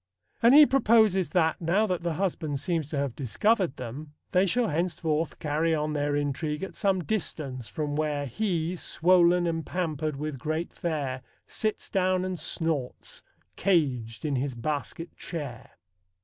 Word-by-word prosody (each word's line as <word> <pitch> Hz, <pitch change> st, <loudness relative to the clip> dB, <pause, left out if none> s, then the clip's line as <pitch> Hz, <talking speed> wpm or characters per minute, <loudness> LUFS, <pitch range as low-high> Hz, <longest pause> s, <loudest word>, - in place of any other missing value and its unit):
And 235 Hz, +4 st, +7 dB
he 300 Hz, 0 st, +10 dB
proposes 220 Hz, -, +4 dB
that, 165 Hz, -3 st, +1 dB
now 180 Hz, +6 st, +2 dB
that 180 Hz, -4 st, -1 dB
the 170 Hz, -1 st, -1 dB
husband 160 Hz, -5 st, -2 dB
seems 160 Hz, -2 st, -1 dB
to 150 Hz, -, -3 dB
have 140 Hz, -4 st, -1 dB
discovered 175 Hz, -, +1 dB
them, 135 Hz, +5 st, -7 dB, 0.2 s
they 185 Hz, +1 st, +4 dB
shall 235 Hz, +5 st, +2 dB
henceforth 165 Hz, -1 st, -1 dB
carry 160 Hz, +2 st, +1 dB
on 150 Hz, 0 st, -1 dB
their 145 Hz, -1 st, 0 dB
intrigue 150 Hz, +3 st, -2 dB
at 195 Hz, -, -5 dB
some 195 Hz, -3 st, +1 dB
distance 140 Hz, -, -3 dB
from 150 Hz, -3 st, -3 dB
where 150 Hz, -2 st, -1 dB
He, 170 Hz, -, -1 dB
swol'n 175 Hz, 0 st, +3 dB
and 165 Hz, -1 st, -1 dB
pampered 155 Hz, -4 st, -2 dB
with 150 Hz, -1 st, -4 dB
great 155 Hz, +5 st, -3 dB
fare, 140 Hz, -6 st, -2 dB, 0.2 s
Sits 215 Hz, -1 st, -2 dB
down 185 Hz, -1 st, +1 dB
and 185 Hz, -2 st, -3 dB
snorts, 155 Hz, -4 st, -2 dB, 0.4 s
cag'd 130 Hz, -, +1 dB
in 145 Hz, -3 st, 0 dB
his 130 Hz, 0 st, -2 dB
basket 150 Hz, +6 st, -4 dB
chair. 145 Hz, -9 st, -7 dB
160 Hz, 150 wpm, -27 LUFS, 145-185 Hz, 0.4 s, he